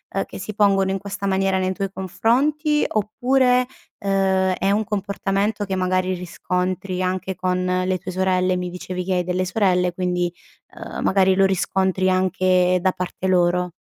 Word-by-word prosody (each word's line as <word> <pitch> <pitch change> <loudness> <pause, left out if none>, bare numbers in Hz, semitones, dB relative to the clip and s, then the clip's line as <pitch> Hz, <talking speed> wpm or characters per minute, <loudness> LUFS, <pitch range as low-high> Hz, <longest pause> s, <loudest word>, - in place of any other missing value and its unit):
uhm, 195 - 0
che - - -10
si 210 +2 -6
pongono 195 -2 +3
in 195 - 0
questa 200 0 -5
maniera 190 0 +1
nei 185 0 0
tuoi 195 0 -3
confronti? 295 - +1
Oppure, 250 +4 +2 0.3
ehm, 190 -1 +1
è 195 +2 +1
un 215 +2 +2
comportamento 200 +1 -1
che 190 - -3
magari 185 0 0
riscontri 180 +1 -3
anche 185 0 -2
con 185 0 -1 0.2
le 185 0 0
tue 185 - -8
sorelle? 185 0 +1
Mi 180 -1 -4
dicevi 180 0 -5
che 190 - 0
hai 180 - +1
delle 180 +1 -1
sorelle, 180 -3 +1
quindi, 180 -1 -1 0.4
ehm, - - -6
magari 190 -1 +3
lo 195 0 +4
riscontri 190 0 +1
anche 185 -1 +2
da 185 0 +2
parte 180 +1 -4
loro. 180 -1 +2
190 Hz, 165 wpm, -22 LUFS, 185-195 Hz, 0.4 s, lo